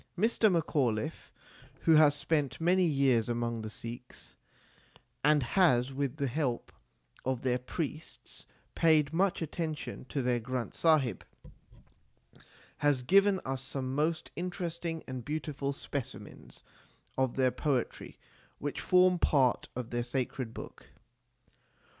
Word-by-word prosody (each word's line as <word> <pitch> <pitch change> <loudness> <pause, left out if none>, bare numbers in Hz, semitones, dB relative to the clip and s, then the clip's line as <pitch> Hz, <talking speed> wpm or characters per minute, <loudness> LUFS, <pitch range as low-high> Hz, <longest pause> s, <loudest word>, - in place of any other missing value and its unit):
Mr. 220 +1 +3
Macauliffe, 145 -5 -1 0.5
who 165 - +4
has 150 -2 +6
spent 145 -3 -1
many 180 +3 +3
years 135 -7 +2
among 120 -1 -1
the 110 - -5
Sikhs, 120 +3 -9 0.9
and 150 -1 +4
has 130 -4 +3
with 140 0 -2
the 140 - 0
help 130 -2 -2 0.5
of 130 -1 -2
their 125 -1 +1
priests 155 +4 -6 0.3
paid 155 -2 +3
much 180 0 +1
attention 155 -3 -4
to 135 0 -3
their 125 -1 +1
Granth 125 +1 -4
Sahib, 145 - +2 1.5
has 145 -4 +2
given 195 +6 +4
us 135 0 -3
some 135 -1 -4
most 155 +3 -1
interesting 170 -2 -4
and 130 -2 -5
beautiful 150 -1 -3
specimens 140 -2 -7 0.5
of 130 -2 0
their 130 -1 +3
poetry 130 0 -2 0.4
which 145 0 -4
form 180 -1 +4
part 130 -7 +2
of 125 -2 -5
their 120 0 -1
sacred 125 -1 -3
book. - - -10
140 Hz, 120 wpm, -31 LUFS, 125-160 Hz, 1.5 s, has